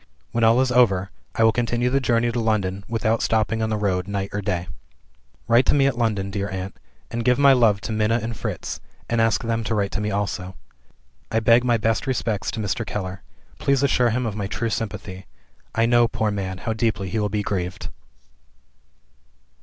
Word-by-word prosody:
When 115 - 0
all 115 +2 +5
is 130 -1 +1
over, 100 -6 +3 0.2
I 115 - +2
will 110 - +6
continue 120 +1 0
the 135 - +3
journey 120 -2 +1
to 120 - -2
London, 100 -4 0
without 115 0 0
stopping 110 0 +1
on 110 - 0
the 110 - 0
road 95 -3 -1
night 100 -1 -3
or 105 - -2
day. 90 -2 -2 0.8
"Write 120 +2 +4
to - - +4
me 140 -1 +4
at 135 -3 +2
London, 105 -5 -1
dear 100 +1 -2
aunt; 95 0 -5 0.4
and 120 0 -2
give 125 0 +3
my 140 -1 +6
love 110 -6 +3
to - - -5
Minna 110 +2 +1
and 115 0 -4
Fritz - - -4 0.3
and 115 -1 +1
ask 115 -1 +2
them 115 0 -1
to 110 +1 -1
write 100 -2 0
to 105 - -2
me 105 - -1
also. 95 -2 -3 0.7
I 115 - +1
beg 115 +2 +5
my 120 -2 +3
best 115 +5 0
respects 115 -5 -1
to 115 - -4
Mr. 105 +1 -1
Keller. 95 -3 -5 0.4
Please 140 -1 +2
assure 125 -3 +3
him 125 +2 -1
of 110 -3 -3
my 100 -2 -3
true 115 +3 -2
sympathy; 95 -3 -5 0.5
I 115 - +3
know, 120 0 +4
poor 110 -1 -1
man, 95 -2 -3
how 110 +4 -3
deeply 110 -4 -1
he 110 - -1
will 105 -1 0
be 105 0 -1
grieved." 95 -1 -3
110 Hz, 205 wpm, -23 LUFS, 100-115 Hz, 0.8 s, will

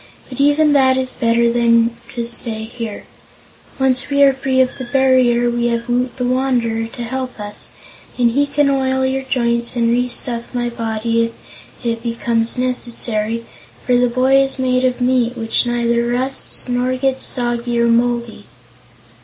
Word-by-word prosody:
But 255 - -9
even 290 +1 +4
that 260 -2 +4
is 260 -1 -1
better 235 0 +2
than 230 -1 +3 0.2
to 235 -1 -2
stay 230 -2 -4
here. 225 -1 -7 0.7
Once 265 0 +1
we 280 0 +3
are 275 -1 +6
free 265 0 -1
of 255 -1 +3
the 260 - -4
barrier, 255 -2 +3
we 240 0 0
have 235 0 -2
Woot 245 +1 -1
the 250 - -1
Wanderer 245 -3 0
to 240 +1 -8
help 255 0 -5
us, 205 0 -6 0.5
and 240 -2 +3
he 285 +4 +1
can 285 0 +1
oil 265 -1 +1
your 265 +1 -1
joints 235 -2 0
and 235 -1 +2
restuff 240 -1 -1
my 240 0 -1
body, 230 0 -1
if 230 +1 -14
it 230 -1 -1
becomes 230 0 0
necessary, 230 -3 -2 0.4
for 250 - +2
the 245 0 +3
boy 260 +3 +3
is 270 0 -2
made 255 -1 +1
of 250 0 -1
meat, 245 -1 +1
which 225 +1 0
neither 235 0 0
rusts 255 +3 -2
nor 250 +1 0
gets 265 0 -1
soggy 240 -1 -1
or 235 - +3
moldy." 235 0 0
245 Hz, 165 wpm, -18 LUFS, 235-260 Hz, 0.7 s, are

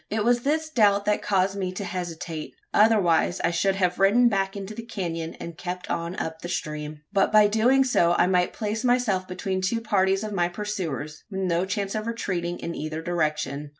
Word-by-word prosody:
It 215 0 0
was 240 +1 +3
this 315 +4 0
doubt 205 -6 +3
that 210 0 +1
caused 195 -1 +1
me 190 -2 -2
to 195 - -4
hesitate; 165 -3 -5 0.2
otherwise 195 -5 +3
I - - +2
should 190 +3 +1
have 180 -2 0
ridden 230 +5 +5
back 195 -2 -1
into 200 +1 -6
the 230 - -6
canon, 170 -8 -4
and 170 -1 -8
kept 180 0 -5
on 170 +2 -2
up 160 -2 -4
the 175 - -6
stream. 150 -2 -4
But 195 - +3
by 215 -1 +7
doing 230 +6 +4
so 175 -10 +3
I - - +4
might 180 -1 +2
place 215 +1 -3
myself 245 -7 +1
between 185 +1 -3
two 210 +5 0
parties 195 -3 +1
of 215 -1 -4
my 175 -3 +2
pursuers, 175 -6 -4
with 195 -2 -4
no 180 -1 +1
chance 195 0 -2
of 215 0 -3
retreating 180 -7 -2
in 170 - -5
either 155 0 -4
direction. 150 -4 -1
190 Hz, 200 wpm, -25 LUFS, 170-210 Hz, 0.2 s, by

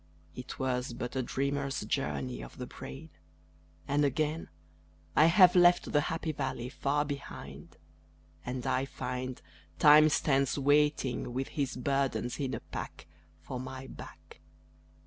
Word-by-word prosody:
It 125 - -7
was 125 -1 -1
but 120 +1 -5
a 130 - +1
dreamer's 140 +2 -2
journey 70 - -2
of - - -10
the 125 - -5
brain; 145 +5 -9 0.8
And 145 +1 +2
again 155 +3 0 0.7
I 155 - +7
have 180 +1 +7
left 175 0 +5
the 145 - +3
happy 160 +1 -2
valley 130 -4 -3
far 145 +3 0
behind; 145 -1 -8 0.7
And 125 +1 -4
I 130 0 +1
find 130 -1 -5 0.4
Time 150 +1 +8
stands 140 -2 +2
waiting 145 -3 +2
with 135 +1 -2
his 140 -4 -2
burdens 135 -1 -1
in 135 -3 -1
a - - -6
pack - - -7 0.4
For 130 -2 -6
my 130 +1 -7
back. - - -12
135 Hz, 135 wpm, -31 LUFS, 125-145 Hz, 0.8 s, Time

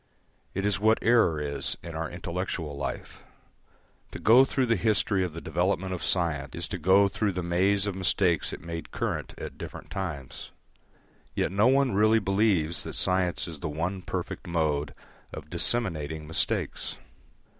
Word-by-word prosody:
It 95 +1 -1
is 105 -2 +1
what 110 +2 +4
error 115 -10 +4
is 70 -1 -2
in 85 - -7
our 80 0 -3
intellectual 85 -3 -4
life. 70 -3 -5 0.9
To - - -4
go 120 +5 +6
through 135 -1 0
the 115 -1 +2
history 105 -2 +1
of 90 -4 -3
the 85 - -7
development 90 +3 0
of 90 - -5
science 75 -6 0
is - - -1
to - - -4
go 100 +2 +5
through 100 +1 -1
the 90 0 -3
maze 95 +4 +2
of 100 - -1
mistakes 90 -2 +1
it - - -7
made 85 -1 -6
current - - -3
at - - -8
different - - -8
times. 75 -9 -5 0.8
Yet - - 0
no 100 +4 +4
one 135 0 +4
really 110 +3 +4
believes 95 -6 +1
that - - -6
science 90 -1 +1
is 80 -3 -6
the 80 - -3
one 85 +5 -3
perfect - - -5
mode 75 -4 0 0.4
of - - -9
disseminating 80 -9 0
mistakes. 80 +1 -1
90 Hz, 165 wpm, -27 LUFS, 80-100 Hz, 0.9 s, go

